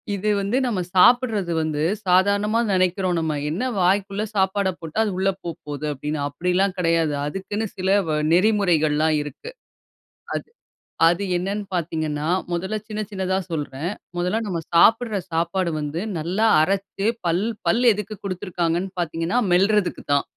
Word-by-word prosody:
இது 205 +2 -1
வந்து 200 +6 0
நம்ம 230 -6 -1 0.2
சாப்ட்றது 220 -3 +4
வந்து 155 -2 -2 0.3
சாதாரணமா 200 +4 +3
நெனைக்கிறோம் 185 -1 +1
நம்ம. 160 -1 -1 0.2
என்ன 175 +10 -2 0.2
வாய்க்குள்ள 195 +3 +1
சாப்பாட 195 0 +1
போட்டா, 165 +1 -8
அது 210 - -1
உள்ள 195 +1 +2
போப்போகுது 150 -3 -6
அப்டின்னு. 150 +2 -4
அப்டிலாம் 180 +4 0
கெடையாது. 165 -3 +2
அதுக்குன்னு 195 +6 -3
சில 190 0 -1 0.2
வ 155 - 0 0.2
நெறிமுறைகள்லாம் 165 -6 +3
இருக்கு. 150 - -8 0.9
அது, - - -3 0.6
அது 175 +4 0
என்னன்னு 200 +4 -2
பார்த்தீங்கன்னா 155 -3 -2 0.3
மொதல்ல 190 +5 -2
சின்ன 215 0 -4
சின்னதா 190 -1 -1
சொல்றேன். 150 +1 -3 0.3
மொதல்ல 180 +6 0
நம்ம 175 -3 -2 0.2
சாப்ட்ற 220 +4 +4
சாப்பாடு 170 +2 0
வந்து 150 +3 -3 0.2
நல்லா 180 +8 0 0.2
அரச்சு 195 +3 -1 0.2
பல் 175 +4 +1 0.2
பல் 235 +2 +3
எதுக்கு 210 +1 -5
குடுத்திருக்காங்கன்னு 180 -1 -2
பார்த்தீங்கன்னா, 165 +5 -1
மெல்றதுக்குதான். 185 -6 +2
185 Hz, 130 wpm, -23 LUFS, 165-200 Hz, 0.9 s, சாப்ட்றது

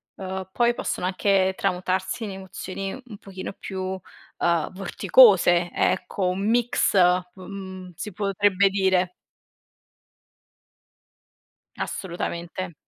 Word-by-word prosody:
ehm, 190 -1 -6
poi 240 +2 +2
possono 180 - -3
anche 190 0 +2
tramutarsi 185 +4 -1
in 205 - -4
emozioni 190 0 -6
un 215 -5 -10
pochino 190 0 -7
più, 190 -1 -7
uhm, 185 -3 -3
vorticose, 190 -3 +5
ecco, 190 +1 0
un 195 +3 -1
mix, 240 -3 +2 0.4
mhmm, 190 -1 -8
si 210 - -6
potrebbe 200 0 +2
dire. 190 -2 +2 2.7
Assolutamente. 175 0 -4
190 Hz, 95 wpm, -24 LUFS, 185-200 Hz, 2.7 s, vorticose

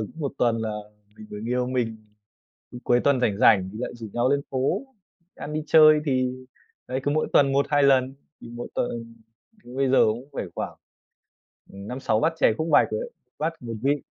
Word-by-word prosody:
cứ 110 - -6
1 140 - -2
tuần 115 -2 +2
là 110 -1 -2 0.6
người 105 - -7
yêu 125 0 0
mình 120 -3 -2 0.8
cứ 125 - -8
cuối 120 0 +3
tuần 140 -1 +2
rảnh 105 -4 +1
rảnh 95 -5 +4
thì 110 - -9
lại - - -3
rủ 115 -2 -8
nhau 120 +2 +1
lên 140 0 +2
phố 130 - 0 0.5
ăn, 150 - -7
đi 155 0 -2
chơi 155 -1 +7
thì, 130 -2 +1 0.6
đấy, 130 +1 -2
cứ 145 - 0
mỗi 155 +1 0
tuần 140 -1 +5
1-2 140 +1 +2
lần. 135 -1 +3 0.3
Thì 115 - -10
mỗi 120 - -6
tuần 115 -1 -3 0.5
bây 130 +2 -1
giờ 130 - +5
cũng 120 +6 -2
phải - - -3
khoảng, - - -4 1.0
ừm, 100 +1 -9
5-6 125 -4 -1
bát 160 +6 +1
chè - - +4
khúc 160 - -2
bạch - - +5
rồi 465 - -2
đấy, - - -7 0.3
bát 160 +2 -1
1 115 -2 -6
vị. 140 +1 +1
130 Hz, 200 wpm, -24 LUFS, 115-140 Hz, 1.0 s, chơi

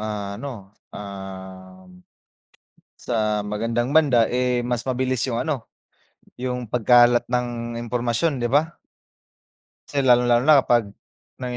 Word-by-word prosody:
ano, 105 +1 -6 0.2
um, 95 -2 -10 1.0
sa 105 -3 -1
magandang 115 +5 -2
banda, 135 -8 +4
eh, 125 0 0
mas 120 -1 -1
mabilis 130 -1 -1
'yung 115 - -2
ano, 140 -7 -3 0.7
'yung 125 -1 -4
pagkalat 120 0 +4
ng 120 -1 -3
impormasyon, 120 +5 -1
di 120 - -1
ba? 155 +6 +1 1.1
Kasi 140 -2 -1
lalong-lalo 120 -1 +4
na 150 -2 +7
kapag 115 -6 +1 0.5
may 125 -1 -4
120 Hz, 110 wpm, -22 LUFS, 105-125 Hz, 1.1 s, na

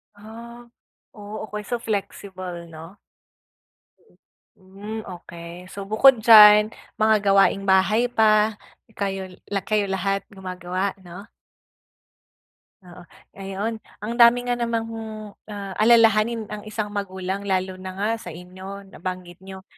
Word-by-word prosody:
Ah, 235 +3 -12 0.5
oo 210 -2 -11
okey, 210 -1 -6
so 240 - -2
flexible 185 -5 -5
'no? 165 +4 -12 1.6
Hmm, 200 +4 -8
okey. 170 0 -10
So 200 - -6
bukod 225 +2 +5
diyan, 210 -1 +9 0.3
mga 220 0 +5
gawaing 195 0 +3
bahay 195 +5 +3
pa, 220 -2 +3 0.4
kayo 195 -2 -3 0.2
la 200 -1 0
kayo 210 -2 0
lahat 195 +1 -1
gumagawa 185 0 -4
'no? 180 +2 -11 1.6
Oo, 180 0 -13 0.4
ayun. 200 +4 -4 0.2
Ang 220 +2 -3
dami 240 +1 +6
nga 245 0 -2
namang, 230 -1 -1 0.6
ah, 200 -2 -7
alalahanin 225 0 +4
ang 210 0 -7
isang 215 -1 -4
magulang 195 -1 -4
lalo 185 -1 -1
na 185 0 -8
nga 205 +3 -1
sa - - -12
inyo 185 +4 -9
nabanggit 180 -1 -7
niyo, 190 0 -11
200 Hz, 120 wpm, -23 LUFS, 185-220 Hz, 1.6 s, diyan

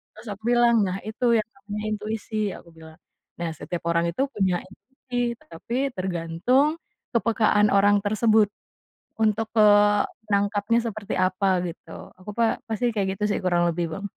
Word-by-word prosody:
Terus 215 +2 -13
aku 210 +3 -16
bilang, 240 -1 +4
"Nah 185 +1 -2
itu 240 +3 -3
yang 215 - -3 0.2
namanya 210 +1 -5
intuisi." 215 -1 -3
Aku 170 - -16
bilang. 160 0 -14 0.4
Nah, 170 -1 -2
setiap 170 +3 -6
orang 170 0 +2
itu, 220 - -3
punya 190 -3 +1
intuisi 245 +2 -5
tetapi 170 +8 -8 0.2
tergantung, 185 - +1 0.4
kepekaan 215 -2 +3
orang 205 +1 +5
tersebut. 215 0 +3 0.7
Untuk, 220 0 +1
eee, 205 0 +6 0.3
nangkapnya 205 +3 +2
seperti 215 -2 -5
apa, 185 0 +2
gitu. 170 - -10 0.3
Aku 210 +3 -8
pa 230 -1 +2
pasti 230 +2 0
kayak 195 -2 -1
gitu 210 - -4
sih, - - 0
kurang 175 -1 +2
lebih 170 +1 -1
Bang. 200 - -6
205 Hz, 150 wpm, -24 LUFS, 185-225 Hz, 0.7 s, eee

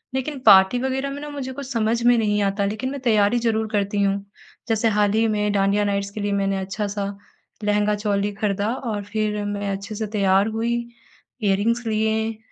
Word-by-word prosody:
लेकिन 270 +2 -3
पार्टी 195 +3 +7
वग़ैरह 265 +1 -1
में 280 - -6
ना 295 - -6
मुझे 275 -3 -5
कुछ 275 0 -7
समझ 230 0 0
में 240 0 +5
नहीं 210 -2 +1
आता 200 +1 0
लेकिन 215 +6 -2
मैं 280 - -5
तैयारी 220 -1 +3
ज़रूर 220 -2 0
करती 205 -1 0
हूँ। 200 0 0 0.4
जैसे 225 0 +2
हाल 210 -1 +2
ही 225 +1 +3
में 210 -1 0
डांडिया 200 +1 +2
नाइट्स 200 0 -1
के 210 - -6
लिए 205 0 -1
मैंने 195 -1 0
अच्छा-सा 200 +1 -3 0.6
लहँगा-चोली 205 -1 +1
खरीदा 205 +2 -1
और 220 -6 -4
फिर 210 0 -2
मैं 205 0 -3
अच्छे 200 +2 -5
से 215 0 -3
तैयार 200 -1 +2
हुई 230 +1 0 0.7
इयररिंग्स 215 +4 +1
लिए, 220 0 0
210 Hz, 180 wpm, -22 LUFS, 200-225 Hz, 0.7 s, पार्टी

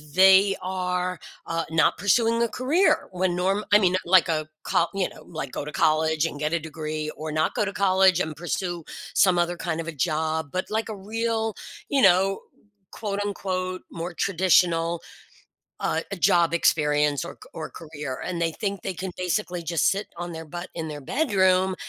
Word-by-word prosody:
they 190 +1 +6
are, 180 -1 -2 0.3
uh, 165 0 -1
not 165 0 +3
pursuing 230 +3 +2
a 230 - 0
career 300 +6 +2
when 180 -1 0
norm 195 +3 +1
I 205 - +8
mean, 185 -2 +3
like 185 +1 +5
a 155 -1 -1
coll 170 - +2
you 195 -2 0
know, - - -14
like 155 -6 -6
go - - -3
to 150 - -6
college 155 0 +2
and 145 -3 -4
get 150 +1 -1
a 170 - +2
degree 155 -1 -5
or 155 0 -5
not 155 +1 0
go - - +1
to 200 - -3
college 190 -2 +4
and 155 -3 -2
pursue 175 0 -3 0.3
some 180 -2 +4
other 175 0 +1
kind 165 -2 -3
of 165 - -4
a - - -2
job, 155 +1 -1
but 185 +1 -2
like 220 +1 -2
a 215 - -4
real, 225 +2 -2 0.3
you 275 -2 +2
know, 195 +1 +4 0.5
quote, 205 -2 -3
unquote, 185 -2 -3
more 170 +1 -5
traditional, 170 -2 +2 0.8
uh, - - 0 0.2
job 170 -1 +4
experience 150 -2 +2
or - - -7
c - - -13
or 160 - -5
career 150 -4 -7
and 175 -2 -3
they 165 -1 +1
think 200 -1 -4
they 190 - -3
can 185 +2 -5
basically 180 -1 -2
just 170 -1 +2
sit 200 +1 -2
on 175 0 -5
their 160 0 -7
butt 175 +3 -7
in 165 -1 -3
their 150 -1 -6
bedroom 190 - +2
180 Hz, 185 wpm, -25 LUFS, 160-195 Hz, 0.8 s, I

